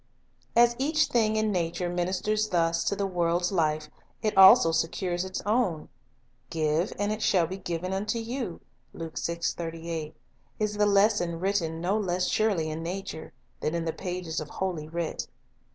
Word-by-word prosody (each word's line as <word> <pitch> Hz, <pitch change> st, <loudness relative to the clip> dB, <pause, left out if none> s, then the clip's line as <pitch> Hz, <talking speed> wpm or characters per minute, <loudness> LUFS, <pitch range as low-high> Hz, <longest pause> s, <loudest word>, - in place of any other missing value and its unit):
As 240 Hz, 0 st, +5 dB
each 305 Hz, +3 st, +2 dB
thing 220 Hz, -2 st, +2 dB
in 215 Hz, 0 st, +1 dB
nature 175 Hz, -1 st, -1 dB
ministers 185 Hz, +5 st, 0 dB
thus 165 Hz, -1 st, +1 dB
to 200 Hz, -, +1 dB
the 200 Hz, -, -1 dB
world's 175 Hz, -1 st, 0 dB
life, 155 Hz, -4 st, +1 dB, 0.4 s
it 215 Hz, -, 0 dB
also 190 Hz, -2 st, +8 dB
secures 175 Hz, +2 st, -1 dB
its 190 Hz, 0 st, -5 dB
own. 205 Hz, -8 st, 0 dB, 0.6 s
"Give, 160 Hz, +2 st, 0 dB
and 205 Hz, +1 st, 0 dB
it 215 Hz, 0 st, -3 dB
shall 185 Hz, -5 st, +3 dB
be 185 Hz, +4 st, -5 dB
given 175 Hz, +1 st, -3 dB
unto 210 Hz, +4 st, -1 dB
you," 230 Hz, -4 st, -4 dB, 0.3 s
3 165 Hz, -1 st, -6 dB, 1.5 s
is 210 Hz, -1 st, -1 dB
the 210 Hz, 0 st, +4 dB
lesson 200 Hz, -4 st, +3 dB
written 175 Hz, -4 st, 0 dB
no 195 Hz, +5 st, +1 dB
less 180 Hz, -3 st, 0 dB
surely 195 Hz, -8 st, +1 dB
in 155 Hz, +1 st, -4 dB
nature 175 Hz, -1 st, -5 dB, 0.3 s
than 155 Hz, -, -1 dB
in 165 Hz, -1 st, -1 dB
the 160 Hz, -, -1 dB
pages 180 Hz, -3 st, -4 dB
of 155 Hz, -, -6 dB
Holy 175 Hz, -5 st, -3 dB
Writ. 165 Hz, 0 st, -3 dB
185 Hz, 155 wpm, -28 LUFS, 165-210 Hz, 1.5 s, also